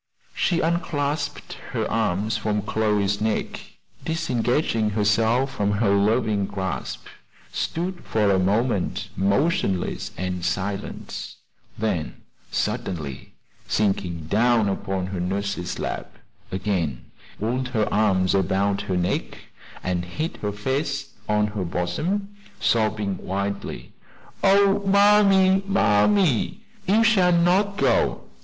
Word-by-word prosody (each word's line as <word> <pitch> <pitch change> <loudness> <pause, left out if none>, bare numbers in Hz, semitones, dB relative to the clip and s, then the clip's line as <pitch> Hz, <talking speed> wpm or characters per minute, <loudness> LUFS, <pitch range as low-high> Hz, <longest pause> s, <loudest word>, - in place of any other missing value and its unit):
She 170 -2 +1
unclasped 145 -3 -1 0.2
her 110 -3 0
arms 110 -1 0
from 105 -2 -1
Chloe's 105 -2 0
neck, 110 0 -1 0.4
disengaging 125 -7 0
herself 115 +5 +2
from 105 0 0
her 100 -1 +2
loving 105 0 +2
grasp, 95 -2 -4 0.5
stood 175 +2 -3
for 105 -2 +1
a 95 - +3
moment 100 +1 0
motionless 100 - 0
and 90 -1 -3
silent; 95 +3 -4 0.4
then, 95 -8 -2 0.3
suddenly 75 -8 -3 0.3
sinking 95 -5 0
down 115 +4 +3
upon 95 -1 -2
her 95 -1 -4
nurse's 90 -1 -2
lap, - - -5 0.3
again 90 - -2 0.3
wound 125 +4 -1
her 110 -5 0
arms 95 -3 +3
about 100 +1 +1
her 90 - +1
neck, 90 0 -1 0.5
and 90 -1 -1
hid 155 - -4
her 105 - -3
face 135 +6 -2 0.2
on 105 0 +3
her 105 -2 -3
bosom, 165 - -2 0.2
sobbing 105 -3 +1
wildly: 100 +1 -4 0.5
"Oh, 195 0 +5
mammy, 195 -1 +5
mammy! 185 - +3 0.3
you 215 +4 +4
shall 195 -6 +4
not 185 +4 +3
go! - - +2
105 Hz, 110 wpm, -24 LUFS, 95-155 Hz, 0.5 s, Oh